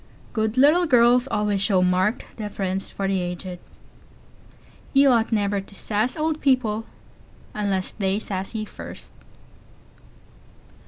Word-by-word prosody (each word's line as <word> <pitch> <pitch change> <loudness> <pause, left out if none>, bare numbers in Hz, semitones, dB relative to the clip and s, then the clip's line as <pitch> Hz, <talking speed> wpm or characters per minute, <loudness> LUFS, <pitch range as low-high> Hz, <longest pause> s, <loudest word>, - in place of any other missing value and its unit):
Good 220 +1 -1
little 310 +6 +5
girls 245 -1 +5
always 210 -5 0
show 195 -3 +3
marked 185 +5 +1
deference 195 -3 -3
for 195 - -3
the 195 -1 +1
aged. 180 0 -5 1.3
You 275 0 +6
ought 235 -2 +2
never 205 -2 +1
to 195 - -14
"sass" 215 - -1
old 310 0 -1
people 225 -5 +1 0.7
unless 200 -3 -1
they 195 -1 -1
"sass" 195 0 -4
you 215 -1 -2
first. - - -10
210 Hz, 120 wpm, -23 LUFS, 195-245 Hz, 1.3 s, You